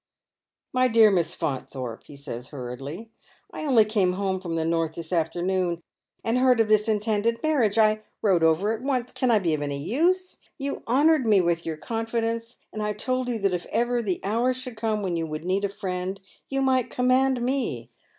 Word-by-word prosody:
" - - -64
My 255 0 +4
dear 225 -3 +6
Miss 175 -2 0
Faunthorpe," 130 -4 -4
he 145 - -12
says 130 -3 -7
hurriedly, 140 - -7 0.2
" - - -32
I - - -5
only 240 -7 +5
came 200 -4 +1
home 190 -1 -1
from 170 -3 -4
the 160 -1 0
north 165 -1 0
this 170 +1 -6
afternoon, 175 +1 0 0.4
and 230 +2 +1
heard 255 -2 +4
of 225 - +4
this 215 0 +4
intended 220 +2 0
man 310 -2 +2
iage, 210 -1 +1
I 215 -1 +4 0.2
rode 190 -5 +3
over 165 +7 +3
at 225 - -5
once. 255 -2 -1
Can 255 - 0
I 230 - +5
be 175 -6 0
of 150 - -1
any 145 -1 -2
use? 345 - 0 0.2
You 280 0 -4
honoured 280 +2 +4
me 210 -3 +5
with 170 -2 0
your 160 -1 -3
confidence, 230 +3 -3 0.2
and 215 - -4
I 210 0 -1
told 255 +4 -1
you 240 - -1
that 195 -2 +2
if 175 -1 -3
ever 240 +2 0
the 195 -6 -2
hour 235 +6 +1
should 255 -2 -7
come 215 -1 -1
when 180 -3 -1
you 165 -1 -2
would 155 +1 -6
need 195 +2 +1
a - - -1
friend, 190 -1 -4 0.3
you 270 0 0
might 260 -2 +2
command 255 +1 +2
me. 240 - -1
210 Hz, 210 wpm, -25 LUFS, 170-245 Hz, 0.4 s, dear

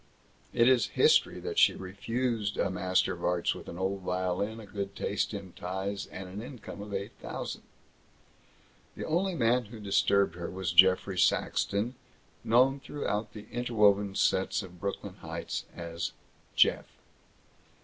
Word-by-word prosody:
It 120 - +4
is 130 -4 +5
history - - +4
that - - -1
she - - +6
refused 105 +3 -2
a 95 - +1
master 90 0 +1
of - - -9
arts 90 -1 +1
with - - -9
an 85 - -7
old 95 +1 -1
violin, 95 +4 -1
a 110 - -9
good 100 -1 -5
taste 100 - -1
in 100 -4 -7
ties, 95 +3 -4
and 95 0 -8
an 95 +3 -7
income 115 -5 -9
of 105 0 -8
eight 100 0 -3
thousand. - - -5 1.3
The - - -5
only 180 +3 0
man 120 -2 +2
who 110 +1 -10
disturbed 100 -2 +2
her 85 -1 -5
was 95 -2 -3
Geoffrey 95 +1 +5
Saxton, 105 +8 +1 0.5
known 130 +4 +4
throughout 105 -7 -3
the 105 -1 -9
interwoven 105 -5 +2
sets 95 -1 +2
of 90 -1 -12
Brooklyn 100 +1 -4
Heights - - -5
as 85 0 -4 0.4
"Jeff." - - +4
100 Hz, 150 wpm, -30 LUFS, 95-115 Hz, 1.3 s, she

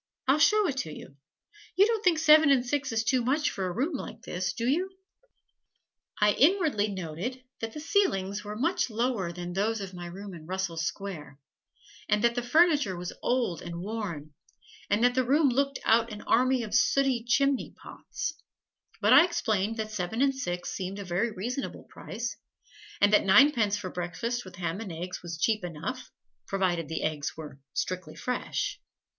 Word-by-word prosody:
I'll 275 +3 +4
show 425 +7 +5
it 275 - -2
to 160 -12 -3
you. 140 - -11 0.6
You 395 - +6
don't 445 -1 0
think 360 -3 +4
seven 310 -1 +6
and 260 -3 +4
six 275 +1 -1
is 225 0 0
too 250 +2 +1
much 290 +5 +1
for 190 -1 -3
a - - -2
room 270 - -1
like 270 - -6
this, 180 0 -2
do 235 0 -3
you?" 350 +8 +1 1.3
I 210 0 +5
inwardly 300 - +3
noted 190 +7 -5 0.2
that 225 -1 -5
the - - -6
ceilings 210 - 0
were 210 0 -6
much 305 +5 0
lower 225 -5 -1
than 175 0 -6
those 215 +4 0
of 195 -2 -6
my 175 -1 -7
room 195 +3 -8
in 160 -2 -11
Russell 185 -2 -3
Square 165 -4 -5 0.7
and 210 +1 +2
that 235 0 +4
the 245 - -1
furniture 290 - +3
was 175 0 -5
old 245 -9 0
and 170 -1 -6
worn 185 -8 -5 0.6
and 210 +3 +2
that 245 0 +5
the 260 +1 +2
room 280 +3 +3
looked 275 +2 0
out 230 +1 +3
on 210 -1 -7
an - - -15
army 255 +1 +3
of 210 -2 -7
sooty 255 +2 +3
chimney 275 +3 +1
pots, - - -6 0.7
but - - +5
I - - +9
explained 225 - 0
that 215 -1 -3
seven 210 +2 -3
and 275 -1 +3
six 180 -9 -4
seemed 190 +1 -4
a 200 - -6
very 180 +6 0
reasonable 240 +7 -4
price, 235 +1 -6 0.6
and 205 +1 +4
that - - +6
ninepence 210 0 +5
for 190 -3 -6
breakfast 195 +8 -3
with 185 -1 -11
ham 180 +2 -3
and 205 -5 -6
eggs 175 +3 -6
was 170 -1 -6
cheap 210 +4 +1
enough, 175 +10 -5 0.4
provided 180 -5 0
the 160 - -3
eggs 155 -1 -2
were 150 -3 -9 0.2
strictly 180 -4 -3
fresh. 250 0 -3
215 Hz, 185 wpm, -28 LUFS, 180-260 Hz, 1.3 s, I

